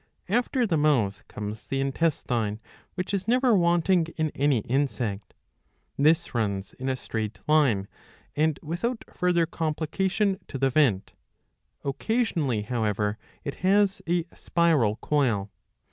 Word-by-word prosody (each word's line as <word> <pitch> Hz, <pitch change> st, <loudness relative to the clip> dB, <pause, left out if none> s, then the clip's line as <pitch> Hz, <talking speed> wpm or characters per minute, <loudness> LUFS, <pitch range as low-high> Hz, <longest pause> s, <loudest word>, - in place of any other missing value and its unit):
After 245 Hz, +3 st, +1 dB
the 175 Hz, -7 st, +1 dB
mouth 115 Hz, -10 st, +2 dB
comes 105 Hz, 0 st, -7 dB
the 135 Hz, -, -1 dB
intestine, 130 Hz, -7 st, 0 dB, 0.4 s
which 185 Hz, +2 st, -3 dB
is 195 Hz, 0 st, -1 dB
never 250 Hz, 0 st, +4 dB
wanting 175 Hz, -1 st, +3 dB
in 155 Hz, -2 st, 0 dB
any 140 Hz, -4 st, +2 dB
insect. 120 Hz, -6 st, -2 dB, 0.6 s
This 160 Hz, +3 st, +3 dB
runs 100 Hz, -4 st, -2 dB
in 130 Hz, +1 st, -4 dB
a 130 Hz, -, +1 dB
straight 110 Hz, -4 st, -4 dB
line 135 Hz, -11 st, +3 dB, 0.5 s
and 155 Hz, 0 st, +1 dB
without 220 Hz, +10 st, -2 dB
further 175 Hz, -2 st, +2 dB
com 160 Hz, -1 st, -2 dB
plication 190 Hz, +5 st, 0 dB
to -, -, -5 dB
the 135 Hz, 0 st, +1 dB
vent; 125 Hz, -9 st, +2 dB, 0.7 s
occasionally, 145 Hz, -, 0 dB
however, 105 Hz, -2 st, -1 dB, 0.2 s
it 140 Hz, -, -5 dB
has 195 Hz, +1 st, +3 dB
a 175 Hz, -1 st, +1 dB
spiral 155 Hz, -11 st, +2 dB
coil. 115 Hz, -9 st, +1 dB
150 Hz, 130 wpm, -26 LUFS, 115-175 Hz, 0.7 s, never